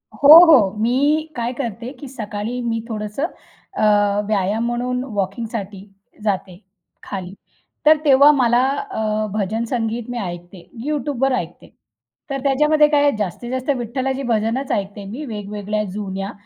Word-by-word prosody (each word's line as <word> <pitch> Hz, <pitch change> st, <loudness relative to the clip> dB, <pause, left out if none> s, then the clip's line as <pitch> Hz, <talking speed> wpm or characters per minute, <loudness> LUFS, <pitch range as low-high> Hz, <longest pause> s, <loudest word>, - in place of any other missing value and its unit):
हो, 285 Hz, -, +3 dB, 0.2 s
हो. 255 Hz, -, +6 dB
मी 285 Hz, +8 st, +1 dB
काय 240 Hz, 0 st, -2 dB
करते, 240 Hz, -2 st, -5 dB
की 285 Hz, -, -8 dB
सकाळी 220 Hz, -1 st, -5 dB
मी 230 Hz, -1 st, -2 dB
थोडंसं 210 Hz, +5 st, -3 dB, 0.5 s
अ, -, -, -1 dB, 0.4 s
व्यायाम 210 Hz, +2 st, 0 dB
म्हणून 250 Hz, +1 st, -2 dB
वॉकिंगसाठी 200 Hz, 0 st, -4 dB, 0.4 s
जाते 195 Hz, -3 st, -2 dB, 0.5 s
खाली. 190 Hz, -2 st, -6 dB, 0.5 s
तर 310 Hz, +1 st, +7 dB
तेव्हा 280 Hz, +1 st, +7 dB
मला 240 Hz, -4 st, +3 dB, 0.3 s
अ, 215 Hz, -, -1 dB
भजन 215 Hz, +2 st, -1 dB
संगीत 230 Hz, -1 st, -3 dB
मी 245 Hz, -, -4 dB
ऐकते, 175 Hz, -2 st, -7 dB, 0.2 s
YouTubeवर 275 Hz, -3 st, 0 dB
ऐकते. 175 Hz, -7 st, -6 dB, 0.6 s
तर 275 Hz, 0 st, -2 dB
त्याच्यामध्ये 300 Hz, +2 st, +4 dB
काय 295 Hz, -1 st, +2 dB
आहे, 290 Hz, -, +4 dB
जास्तीत-जास्त 240 Hz, -, -4 dB
विठ्ठलाची 260 Hz, +3 st, -3 dB
भजनंच 225 Hz, +5 st, -1 dB
ऐकते 200 Hz, 0 st, -3 dB
मी, 230 Hz, +10 st, -7 dB
वेगवेगळ्या 210 Hz, -2 st, -4 dB
जुन्या, 195 Hz, 0 st, -4 dB
230 Hz, 130 wpm, -20 LUFS, 205-265 Hz, 0.6 s, तर